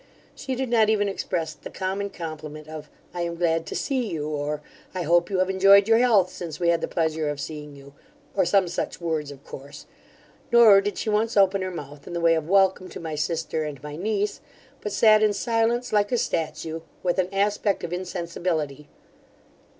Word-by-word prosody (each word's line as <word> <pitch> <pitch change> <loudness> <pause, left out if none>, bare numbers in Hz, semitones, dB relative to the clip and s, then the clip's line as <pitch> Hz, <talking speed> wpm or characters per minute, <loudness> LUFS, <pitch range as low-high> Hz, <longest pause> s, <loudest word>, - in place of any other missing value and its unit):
She 265 -1 -4
did 260 0 -2
not 225 -2 +4
even 205 -2 +2
express 170 -4 -3
the - - -10
common 195 +1 -3
compliment 155 -3 -7
of, 155 -1 -8 0.2
I 175 - -3
am 170 0 -2
glad 165 -1 0
to - - -5
see 260 -4 -1
you; 150 -6 -3
or, 150 0 -3 0.3
I 180 - -1
hope 170 +2 +3
you 195 - -1
have 185 0 +2
enjoyed 195 +1 +6
your 225 0 +5
health 210 -7 +4
since 165 -4 -7
we 170 -1 +2
had 170 -1 +2
the - - -1
pleasure 160 -2 -1
of 145 -1 -4
seeing 150 0 -7
you; 140 0 -14 0.4
or - - +3
some 185 +1 +3
such - - -4
words 160 -4 -2
of 140 -1 -11
course: 140 +1 -10 0.7
nor 225 -4 +8
did 205 +1 -3
she 220 - -2
once 220 +2 +1
open 195 0 +4
her 185 - -2
mouth 145 -5 -9
in - - -7
the 170 - -2
way 165 -1 +4
of 160 0 -2
welcome 190 -1 +3
to - - -8
my 160 -2 -5
sister 160 +1 -2
and 145 -3 -6
my 150 0 -6
niece: 205 +3 -2 0.4
but 210 - -4
sat 215 +1 +5
in 215 -1 +3
silence 230 +2 0
like 205 -1 +2
a 245 - +2
statue, 160 -3 -2 0.2
with 180 +1 +1
an 185 -1 +1
aspect 200 0 0
of 170 - -4
insensibility. 170 -5 -3
175 Hz, 205 wpm, -25 LUFS, 155-205 Hz, 0.7 s, nor